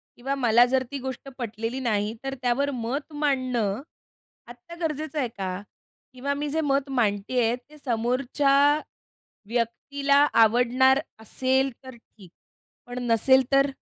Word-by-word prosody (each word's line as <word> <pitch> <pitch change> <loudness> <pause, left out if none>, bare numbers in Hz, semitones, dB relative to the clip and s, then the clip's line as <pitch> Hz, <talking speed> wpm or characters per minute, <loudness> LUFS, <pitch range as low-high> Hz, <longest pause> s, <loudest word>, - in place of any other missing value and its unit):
किंवा 270 +3 -3
मला 240 -2 +5
जर 260 0 +2
ती 280 - -3
गोष्ट 265 +1 -6
पटलेली 230 +1 -4
नाही, 215 -3 0
तर 270 0 -3
त्यावर 265 +3 +1
मत 255 +6 -4
मांडणं 255 -7 0 0.7
आत्ता 245 +8 -12
गरजेचं 310 -1 -2
आहे 255 - 0
का? 185 -1 -3 0.6
किंवा 275 +3 -2
मी 290 +1 -3
जे 320 +2 0
मत 280 -1 0
मांडते 225 -1 0
आहे, 230 +2 +2
ते 285 +5 -18
समोरच्या 275 +3 +2 0.7
व्यक्तीला 275 +5 0 0.3
आवडणार 250 +4 +4 0.2
असेल 260 +4 0
तर 260 -2 -10
ठीक, 210 -5 -18 0.6
पण 245 +1 -6
नसेल 260 +4 +5
तर? 275 +1 +4
260 Hz, 135 wpm, -25 LUFS, 235-280 Hz, 0.7 s, मला